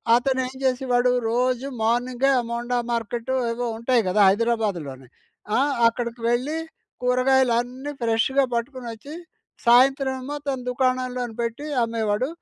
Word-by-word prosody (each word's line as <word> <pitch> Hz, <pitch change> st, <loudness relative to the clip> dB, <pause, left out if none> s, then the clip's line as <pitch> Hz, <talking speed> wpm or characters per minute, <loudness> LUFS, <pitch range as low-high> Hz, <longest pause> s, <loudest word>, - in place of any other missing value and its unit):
అతను 260 Hz, +2 st, +1 dB
ఏం 260 Hz, -, -10 dB
చేసేవాడు, 250 Hz, -1 st, +2 dB, 0.2 s
రోజు 255 Hz, +2 st, 0 dB, 0.2 s
మార్నింగె 245 Hz, +3 st, +1 dB
ఆ -, -, +1 dB
మోండా 240 Hz, +1 st, -2 dB, 0.2 s
మార్కెట్ 235 Hz, +2 st, -3 dB, 0.2 s
ఏవో 240 Hz, +1 st, -3 dB
ఉంటాయి 235 Hz, +1 st, +2 dB
కదా 185 Hz, -, +1 dB
హైదరాబాదులోని. 195 Hz, -, -1 dB, 0.5 s
ఆ! -, -, +3 dB, 0.3 s
అక్కడికి 235 Hz, 0 st, -3 dB
వెళ్ళి 255 Hz, +7 st, 0 dB, 0.5 s
కూరగాయలు 255 Hz, 0 st, +3 dB
అన్నీ 255 Hz, +4 st, -7 dB
ఫ్రెష్‌గా 235 Hz, +4 st, +2 dB
పట్టుకొని 245 Hz, +1 st, -4 dB
వచ్చి 280 Hz, +8 st, -10 dB, 0.5 s
సాయంత్రం 265 Hz, +3 st, +5 dB
ఏమో 285 Hz, +3 st, -5 dB
తన 270 Hz, -1 st, 0 dB
దుకాణంలో 255 Hz, 0 st, 0 dB, 0.2 s
పెట్టి, 235 Hz, +5 st, -3 dB, 0.2 s
అమ్మేవాడు. 225 Hz, +1 st, -1 dB
245 Hz, 125 wpm, -23 LUFS, 230-260 Hz, 0.5 s, సాయంత్రం